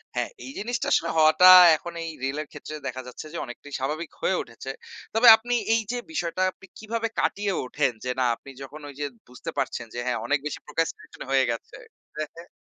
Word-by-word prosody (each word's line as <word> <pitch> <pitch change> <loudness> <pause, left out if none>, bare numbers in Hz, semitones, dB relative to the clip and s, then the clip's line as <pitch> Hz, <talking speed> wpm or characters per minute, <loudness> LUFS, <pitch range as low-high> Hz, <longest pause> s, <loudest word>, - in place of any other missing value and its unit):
হ্যাঁ, - - -1 0.2
এই 265 - -7
জিনিসটা 235 +3 -2
আসলে 165 - +2
হওয়াটা 160 +4 +7 0.3
এখন 170 +2 -8
এই 165 - -4
রিল 135 +2 -1
এর 155 - -8
ক্ষেত্রে 155 - -8
দেখা 130 0 -4
যাচ্ছে 125 - -9
যে, - - -4
অনেকটাই 135 +3 -11
স্বাভাবিক 150 +5 -3
হয়ে 190 - +2
উঠেছে। 120 +3 -8 0.4
তবে 225 +3 +5
আপনি 240 +2 -3 0.2
এই 225 - +3
যে 245 - -2
বিষয়টা 175 - -2
আপনি 190 - -17
কীভাবে 230 +1 -2
কাটিয়ে 205 -1 0
ওঠেন? 140 0 0
যে 125 - 0
না, 130 - +3
আপনি 135 - -15
যখন 145 +3 -10
ওই 140 - -11
যে 145 - -1 0.2
বুঝতে 125 0 -8
পারছেন, 115 - -2
যে 120 - -4
হ্যাঁ, 125 -2 0
অনেক 145 +4 +1
বেশি 150 - -5
procrastination 165 +2 -4
হয়ে 135 -1 +4
গেছে 115 - -7 0.4
হ্যাঁ, 155 -1 -3
হ্যাঁ। 170 +1 -12
155 Hz, 205 wpm, -25 LUFS, 135-190 Hz, 0.4 s, হওয়াটা